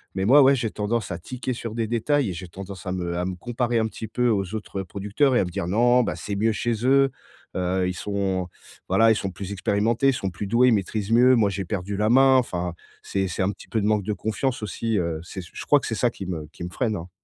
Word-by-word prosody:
mais 95 0 0
moi, 140 +7 +7
ouais 135 +1 +6
j'ai 115 -4 -2
tendance 105 -1 -2
à 85 - -4
tiquer 125 +7 -4
sur 115 -2 -6
des 115 -1 0
détails 120 +1 +1
et - - -4
j'ai 90 +2 -7
tendance 95 +2 -9
à - - -1
me 85 -1 -3
à 90 - -1
me 95 0 -3
comparer 120 +4 -1
un 110 - +1
petit 110 +1 -7
peu 125 +2 +1
aux 100 -1 0
autres 100 -2 -4
producteurs 105 - 0
et - - +4
à - - +2
me 90 - -6
dire: 85 - -3
«Non, 120 +5 +4
bah, - - -2
c'est 100 - -4
mieux 110 +3 +2
chez 115 +1 -2
eux. 135 0 +4 0.4
Heu, 90 0 0
ils 90 - -2
sont 95 -1 -2 0.4
voilà 115 0 +5
ils - - +4
sont 100 -2 -2
plus 95 +2 -7
expérimentés, 105 +6 +1
ils - - +3
sont 95 -6 -3
plus 100 +4 -5
doués, 120 +5 +4
ils 120 - +4
maîtrisent 105 +1 -1
mieux. 125 +2 +6
Moi 105 -4 +3
j'ai 95 0 -3
perdu 100 +1 -3
la 105 +1 +2
main". 130 +2 +6
Enfin, 90 -8 -1 0.3
c'est 95 -1 -1
c'est 90 +1 -2
un 95 - +1
petit 100 - -13
peu 110 - 0
de - - -1
manque 105 -2 +2
de 105 - -2
confiance 110 +3 -2
aussi, 110 +2 -2
heu, 85 -2 -2
c'est 95 +2 -7
c 85 - -13
je - - -7
crois 145 - +5
que - - -7
c'est 110 - -2
ça 120 - +2
qui 95 - -8
me 80 -4 -5
qui - - -9
me 90 - -4
freine, 115 -2 -1
hein. 85 +1 -8
105 Hz, 275 wpm, -24 LUFS, 95-120 Hz, 0.4 s, moi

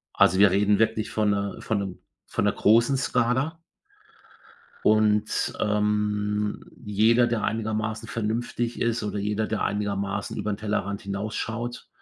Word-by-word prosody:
Also, 95 - +4
wir 100 -2 +7
reden 100 +1 +3
wirklich 110 0 +1
von 105 -1 +1
'ner 100 0 -2
von 110 -2 0
'nem 95 -2 -5 0.3
von - - -1
'ner - - +3
großen 115 +5 +4
Skala. 130 +6 0 1.3
Und, 105 -1 +2
ähm, 105 0 0 0.2
jeder, 110 +4 +4
der 115 -2 -1
einigermaßen 110 0 -2
vernünftig 115 +2 -2
ist 115 -1 0
oder 105 -1 -3
jeder, 105 +2 -1
der 110 - -2
einigermaßen 100 -1 -2
über 105 - -2
'n 100 - -1
Tellerrand 105 -2 -2
hinausschaut 110 +4 -4
105 Hz, 135 wpm, -25 LUFS, 105-115 Hz, 1.3 s, wir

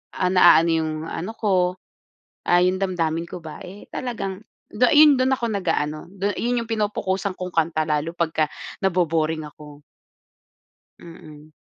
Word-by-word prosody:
ah, 180 -1 0
naano 175 -2 +6
yung 160 -1 0 0.2
ano 190 +7 -5
ko, 185 -5 +1 0.8
ah, 175 0 +5
yung 185 +1 +2
damdamin 165 -3 -1
ko 180 - -7
ba, 155 - -9
eh, 195 +3 -11
talagang 210 -5 -5 0.3
du 210 - -1
yun 295 -1 +7
dun 260 +1 +1
ako 240 -2 -3
nag-aano, 165 -5 -2
du 200 +1 -3
yun 240 +1 0
yung - - -13
pinopukosan 200 -3 -1
kong 185 -1 -5
kanta, 160 -1 +1
lalo 150 +1 -1
pagka 160 -2 0 0.3
nabo-boring 160 -4 0
ako. 150 -1 -14 1.2
Mm. 155 -2 -13
180 Hz, 145 wpm, -22 LUFS, 160-200 Hz, 1.2 s, yun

